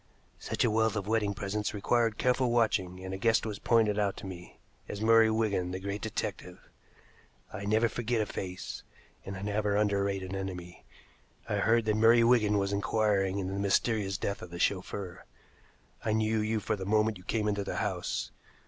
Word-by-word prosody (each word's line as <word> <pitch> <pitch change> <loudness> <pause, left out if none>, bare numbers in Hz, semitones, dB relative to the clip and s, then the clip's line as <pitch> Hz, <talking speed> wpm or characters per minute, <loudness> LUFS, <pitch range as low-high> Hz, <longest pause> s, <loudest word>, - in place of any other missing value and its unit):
Such - - -1
a 120 - +2
wealth 110 0 +2
of 100 -2 -2
wedding 105 -2 0
presents 105 +2 -3
required 115 +2 +1
careful 125 0 +2
watching, 95 -6 0
and 95 - -5
a 95 - -5
guest 115 +1 +2
was 105 -2 -4
pointed 110 -3 +2
out 100 -2 0
to - - -8
me 90 -2 -9 0.3
as 100 - -5
Murray 115 0 +5
Wigan, 110 -5 0
the 95 +1 -4
great 100 +2 -4
detective. 110 - -4 1.0
I 100 - -5
never 110 +3 +3
forget 115 +1 -1
a 110 - +1
face, 90 -2 -6 0.4
and 95 0 -6
I 95 - -7
never 105 0 0
underrate 100 -2 +1
an 95 +1 -5
enemy. 90 -2 -6 0.6
I - - -1
heard 115 0 +3
that 110 -1 +1
Murray 115 +1 +6
Wigan 110 -4 +4
was 100 0 0
inquiring 100 -2 +1
into 95 -1 -3
the 100 - -3
mysterious 100 0 +1
death 100 -2 -3
of - - -8
the 85 - -7
chauffeur. 95 0 -2 0.8
I 110 - 0
knew 110 0 +1
you 110 +1 0
the 95 0 -2
moment 105 0 +1
you - - -15
came 105 +2 -1
into 100 -1 0
the - - -4
house. 95 -5 -2
105 Hz, 185 wpm, -30 LUFS, 95-110 Hz, 1.0 s, Murray